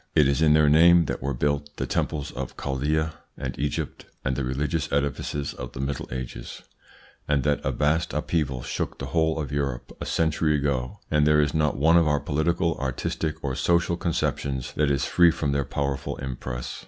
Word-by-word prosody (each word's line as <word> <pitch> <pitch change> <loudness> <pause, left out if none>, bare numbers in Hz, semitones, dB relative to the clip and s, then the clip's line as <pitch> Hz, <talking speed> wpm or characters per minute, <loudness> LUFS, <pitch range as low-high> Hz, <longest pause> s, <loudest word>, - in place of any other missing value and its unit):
It 75 - +6
is 70 +2 +1
in 75 -2 +6
their 75 -1 +5
name 85 +3 +6
that - - -3
were 70 0 -2
built 75 +2 -1
the - - -1
temples 75 -2 -2
of 65 0 -6
Chaldea 75 +4 -1 0.2
and - - -4
Egypt 75 0 -3 0.2
and 65 -1 +1
the 70 - -2
religious 70 +5 -1
edifices 70 0 -1
of 60 0 -8
the - - -8
Middle 70 +1 -3
Ages, 65 -1 -6 0.6
and 70 -2 +2
that 75 -1 +1
a - - 0
vast 80 +3 +1
upheaval 75 -4 -1
shook - - -3
the - - -5
whole 80 -1 +2
of 70 -4 -4
Europe 70 -4 -3
a - - -4
century 80 -1 +1
ago, 70 -4 -1
and 75 -1 +4
there 75 0 +5
is 75 -1 +2
not 75 -2 +1
one 80 +4 +5
of 85 -2 +4
our 75 -1 +2
political, 85 +3 0
artistic, 70 +4 -3
or 70 -2 -1
social 85 +4 +2
conceptions 70 -6 -2
that 75 -1 +1
is 70 -1 +1
free 85 -1 +5
from 75 -3 -1
their 70 -1 0
powerful 70 +1 -2
impress. 65 -1 -5
75 Hz, 190 wpm, -25 LUFS, 70-80 Hz, 0.6 s, It